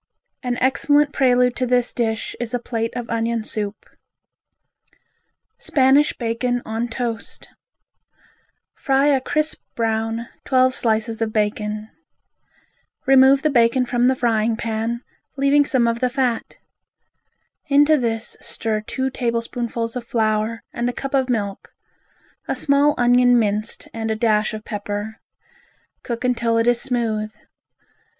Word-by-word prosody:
An 250 -1 -2
excellent 290 +2 +2
prelude 250 -2 +3
to 255 - 0
this 245 0 +1
dish 225 -2 -2
is 240 0 -3
a - - -1
plate 230 -1 -3
of 245 -1 -4
onion 230 0 -1
soup. 210 -1 -4 1.7
Spanish 275 +2 +3
Bacon 245 +1 -1
on 225 +2 -2
Toast 230 -1 -5 1.2
Fry 275 +1 +2
a 270 -2 +3
crisp 305 +4 -1
brown, 225 0 -1 0.2
twelve 255 -1 +3
slices 225 -1 0
of 225 -1 0
bacon. 210 0 -2 1.2
Remove 270 0 +6
the 305 - +2
bacon 240 0 +3
from 245 0 +1
the 260 - +3
frying 230 -2 +1
pan, 230 +1 -3 0.3
leaving 280 +1 +4
some 255 -4 +2
of 230 0 0
the 255 - +1
fat. 245 -3 -2 1.1
Into 290 +2 +5
this 230 -4 -1
stir 215 -1 -2
two 260 +4 -3
tablespoonfuls 235 -1 -2
of 250 - -4
flour 220 -2 -1
and 240 +1 -1
a - - -4
cup 275 +2 -6
of 265 -2 +1
milk; 205 -5 -3 0.7
a - - -1
small 285 +1 +2
onion 245 0 +4
minced 215 -1 -1
and 225 -1 -3
a 220 - 0
dash 215 -1 +1
of 215 - -8
pepper. 205 0 -5 0.8
Cook 235 0 -5
until 235 -2 +1
it 230 - +2
is 240 0 +3
smooth. 220 -4 -1
235 Hz, 130 wpm, -21 LUFS, 225-255 Hz, 1.7 s, Remove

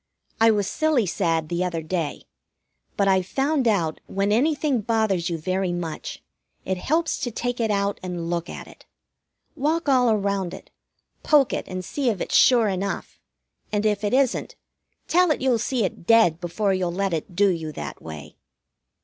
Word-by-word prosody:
I 225 0 +6
was 205 -2 +2
silly 300 +1 +1
sad 165 -3 0
the 175 +2 -1
other 170 -3 -2
day; 160 -2 -3 0.7
but 200 - +2
I've 190 -1 +2
found 275 +2 +1
out 170 -8 +1
when 195 +1 0
anything 280 +1 +2
bothers 210 -5 0
you 170 - -2
very 185 +3 -1
much, 170 -3 -5 0.4
it 190 0 -1
helps 320 - 0
to 255 - -2
take 245 +2 -3
it 225 -1 +1
out 200 -1 0
and 175 -2 -4
look 170 0 -2
at - - -7
it. - - -17 0.7
Walk 315 +3 0
all 255 -3 +4
around 200 -4 0
it, - - -14 0.5
poke 290 -4 +4
it - - -3
and 185 0 -5
see 275 +4 -1
if 210 -5 -2
it's - - -4
sure 240 -4 +6
enough, 195 0 -3 0.5
and, 210 0 0
if 210 -1 +1
it 205 +4 +1
isn't, 270 -2 +1 0.5
tell 360 +1 +4
it 305 - +1
you'll 255 -3 +2
see 240 +1 0
it 170 - -6
dead 225 -8 +5
before 195 +3 0
you'll 185 -2 -1
let 195 +1 -1
it 165 +2 -4
do 200 +2 +4
you 165 -4 -2
that - - -7
way. 75 -2 -9
200 Hz, 180 wpm, -24 LUFS, 175-245 Hz, 0.7 s, I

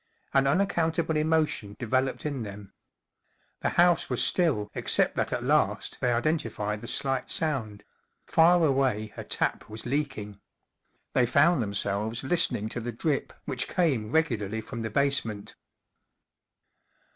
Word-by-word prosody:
An 135 0 +3
unaccountable 165 -1 +1
emotion 155 -9 0
developed 130 +4 -1
in 140 -4 -2
them. 100 -2 -9 0.9
The - - 0
house 175 0 +4
was 125 - +1
still 130 - +1
except - - +2
that - - -1
at - - -2
last - - +1
they 125 - +2
identified 120 -6 -1
the 120 - -8
slight 135 0 -1
sound: 130 - -1 0.4
far 170 +1 +4
away 130 -7 0
a - - -6
tap - - -1
was 110 +1 -5
leaking. 125 -7 -3 0.7
They 125 - +3
found 140 +4 +4
themselves 100 +2 -2
listening 135 - +1
to 120 - -5
the 120 +1 -4
drip 140 +5 -2
which 125 - 0
came 135 - 0
regularly 110 -10 0
from 115 +1 -7
the 110 - -3
basement. 115 -5 0
130 Hz, 135 wpm, -27 LUFS, 110-155 Hz, 0.9 s, house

